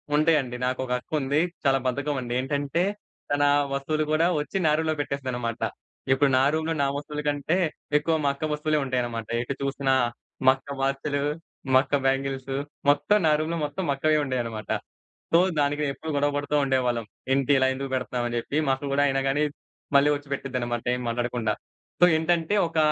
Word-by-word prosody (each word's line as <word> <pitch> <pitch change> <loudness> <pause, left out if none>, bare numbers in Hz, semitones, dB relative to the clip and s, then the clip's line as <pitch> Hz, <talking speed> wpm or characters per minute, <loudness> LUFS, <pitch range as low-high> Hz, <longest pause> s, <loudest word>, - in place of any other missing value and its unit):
ఉంటాయండి. 150 -5 +2
నాకొక 130 0 -2
అక్కుంది. 145 +1 0 0.2
చాలా 135 -1 +3
బద్ధకమండి. 130 -2 -2
ఏంటంటే, 145 +5 0 0.5
తన 145 0 +2 0.3
వస్తువులు 155 +3 0
కూడా 155 +2 +3
వచ్చి 150 +6 -3
నా 150 - +5
రూమ్‌లో 160 -1 0
పెట్టేస్తదన్నమాట. 125 -5 -3 0.5
ఇప్పుడు 135 +1 +4
నా - - +4
రూమ్‌లో 160 +1 0
నా 140 - +2
వస్తువుల 150 +1 -4
కంటే 145 +4 +1 0.4
ఎక్కువ 160 +2 +1
మా 140 - +3
అక్క 145 +3 -3
వస్తువులే 150 0 0
ఉంటాయన్నమాట. 120 -3 -2
ఎటు 125 +3 -3
చూసినా 135 -1 0 0.5
మా 130 - +9
అక్క 140 +1 -8
వాచులు, 140 +1 0 0.5
మా 130 - +8
అక్క 145 - -1
బ్యాంగిల్సు, 135 0 0 0.3
మొత్తం 145 +9 +4
నా - - +5
రూమ్‌లో 165 +2 -1
మొత్తం 170 +6 -4
మా 140 - +3
అక్కవే 155 +2 +2
ఉండేవన్నమాట. 115 -5 -3 0.6
సో, 165 - +7 0.2
దానికి 145 +1 +1
నేనెప్పుడూ 150 +3 -3
గొడవ 145 +1 +2
పడుతూ 145 +1 -1
ఉండేవాళ్లం. 125 -3 +1 0.3
"ఏంటి? 135 +1 +2
ఇలా 130 - +4
ఎందుకు 135 +1 -5
పెడుతున్నావు?" 125 -1 -1
అని 120 0 -2
చెప్పి. 140 +5 -3
మా 135 - +4
అక్క 140 +2 -8
కూడా 145 - +3
అయినా 135 0 +1
కానీ, 145 +3 +2 0.5
మళ్లీ 140 +1 +6
వచ్చి 145 0 -8
పెట్టిద్దన్నమాట, 125 -4 -3
ఏం 125 - -5
మాట్లాడకుండా. 120 -1 -1 0.5
సో, - - +10
ఏంటంటే, 165 +3 +1
ఒక 165 - -6
140 Hz, 170 wpm, -26 LUFS, 130-150 Hz, 0.6 s, సో